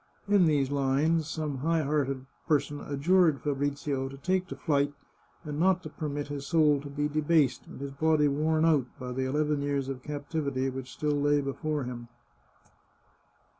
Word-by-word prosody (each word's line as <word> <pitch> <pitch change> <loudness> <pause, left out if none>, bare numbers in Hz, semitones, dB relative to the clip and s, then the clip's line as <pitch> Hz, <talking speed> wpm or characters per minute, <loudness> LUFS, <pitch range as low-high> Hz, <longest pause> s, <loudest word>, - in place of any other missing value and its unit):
In 200 -3 +5
these 140 -3 +2
lines, 145 +3 +1
some 155 -4 -3
high 165 +3 +1
hearted 135 -2 -1 0.2
per 150 -3 +5
son 145 +1 -7
adjured 155 +1 +3
Fabrizio 140 -1 -2
to 135 - -10
take 185 +5 0
to - - -6
flight, 145 -2 +1 0.5
and 150 -1 -5
not 185 +1 +3
to 155 - -6
permit 145 -2 -4
his 140 -1 -5
soul 150 -4 +4
to 145 - -8
be 145 +1 -1
debased, 150 -2 +1
and - - -10
his 140 0 -5
body 155 +1 +3
worn 155 +3 +2
out, 150 -6 +3
by 125 0 -5
the 130 +1 -1
eleven 150 +1 +1
years 140 -1 -1
of 130 -2 -5
captivity 140 -2 -2
which 130 -1 -7
still 150 -1 -1
lay 145 0 +3
before 145 +1 -2
him. 120 -1 -6
145 Hz, 170 wpm, -29 LUFS, 140-155 Hz, 0.5 s, In